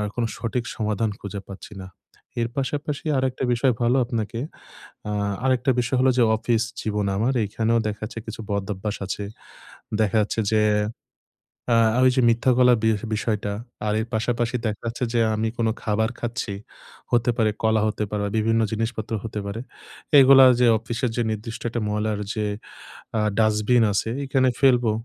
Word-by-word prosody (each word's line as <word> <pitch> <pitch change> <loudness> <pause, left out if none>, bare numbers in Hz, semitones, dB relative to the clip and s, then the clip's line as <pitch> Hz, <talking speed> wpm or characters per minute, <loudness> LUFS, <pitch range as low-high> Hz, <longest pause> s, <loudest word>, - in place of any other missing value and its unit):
কোন 120 - 0
সঠিক 120 +1 -2
সমাধান 110 0 -1
খুঁজে 100 0 -6
পাচ্ছি 100 +2 -10
না। 95 - -9 0.5
এর 115 - -1
পাশাপাশি 145 +2 -3
আরেকটা 130 0 -1
বিষয় 125 +2 +2
ভালো 120 +3 +3
আপনাকে 115 -2 -3 0.7
আ - - -2 0.3
আরেকটা 130 0 +2
বিষয় 125 +2 -1
হলো 130 0 +4
যে - - +6
অফিস 115 0 +1 0.2
জীবন 105 -1 -1
আমার। 115 +6 +1
এখানেও 110 +3 0
দেখা 105 0 -6
যাচ্ছে 115 +1 -6
কিছু 110 0 -7
বদভ্যাস 100 +1 -3
আছে। 100 +1 -4 0.8
দেখা 110 0 +2
যাচ্ছে 105 +2 -2
যে 110 -1 +3 1.1
আ - - +5 0.3
ঐযে 130 0 +4
মিথ্যা 115 +3 +2
বলার 125 -1 +5
বি 110 - +4 0.3
বিষয়টা। 105 -1 -2 0.3
আর 105 - +1
এর - - -3
পাশাপাশি 120 +2 0
দেখা 105 -1 -4
যাচ্ছে 115 +2 -3
যে 120 - +2 0.2
আমি 110 +1 0
কোন 115 - +1 0.2
খাবার 110 +1 +1
খাচ্ছি, 115 -3 -3 0.6
হতে 120 0 +3
পারে, 110 -2 +3
কলা 110 -1 +3
হতে 105 0 -2
পারে 105 0 -2
বা, - - -2
বিভিন্ন 115 +1 +2
জিনিসপত্র 110 0 -3
হতে 110 -2 -4
পারে। 100 +3 -4 0.6
এগুলা 135 0 +8
যে 125 - +5
অফিসের 120 +2 -2
যে - - +2
নির্দিষ্ট 110 +2 -5
একটা 120 - -3
ময়লার 105 0 -1
যে 105 -1 -2 0.7
আ - - +2 0.2
ডাস্টবিন 110 +2 +3
আছে, 105 - 0 0.2
এখানে 130 -1 +2
ফেলবো। 125 -4 +4
115 Hz, 165 wpm, -23 LUFS, 105-120 Hz, 1.1 s, এগুলা